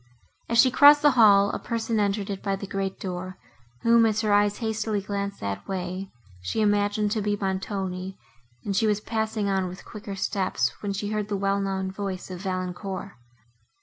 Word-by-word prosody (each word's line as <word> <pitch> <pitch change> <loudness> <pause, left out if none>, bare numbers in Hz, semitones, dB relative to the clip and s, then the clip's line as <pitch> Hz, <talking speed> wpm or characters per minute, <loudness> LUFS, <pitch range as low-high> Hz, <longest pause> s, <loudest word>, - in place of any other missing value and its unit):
As 230 - +1
she 255 +2 +6
crossed 290 +3 +7
the 295 - +7
hall, 205 -5 +6
a - - -3
person 230 -1 -2
entered 200 0 0
it 195 - -5
by 195 -1 -1
the 195 - -6
great 195 0 -3
door, 185 0 -5 0.5
whom, 230 0 +5
as 220 0 0
her 210 -2 +1
eyes 205 0 +3
hastily 220 -2 -1
glanced 200 0 -4
that 100 0 -4
way, 185 0 -4 0.3
she 90 - -3
imagined 205 0 +2
to 215 - 0
be 205 0 0
Montoni, 190 -1 -3 0.5
and 200 - -1
she 220 +3 +2
was 210 -1 +2
passing 220 -1 -2
on 190 -1 0
with 180 +1 -9
quicker 210 -2 -7
steps, 185 - 0
when 205 - -2
she 205 +1 -3
heard 210 -1 -1
the 205 -1 -2
well 195 0 +1
known 190 -1 -2
voice 190 -2 -5
of 180 - -6
Valancourt. 185 +1 -4
200 Hz, 185 wpm, -26 LUFS, 190-215 Hz, 0.5 s, crossed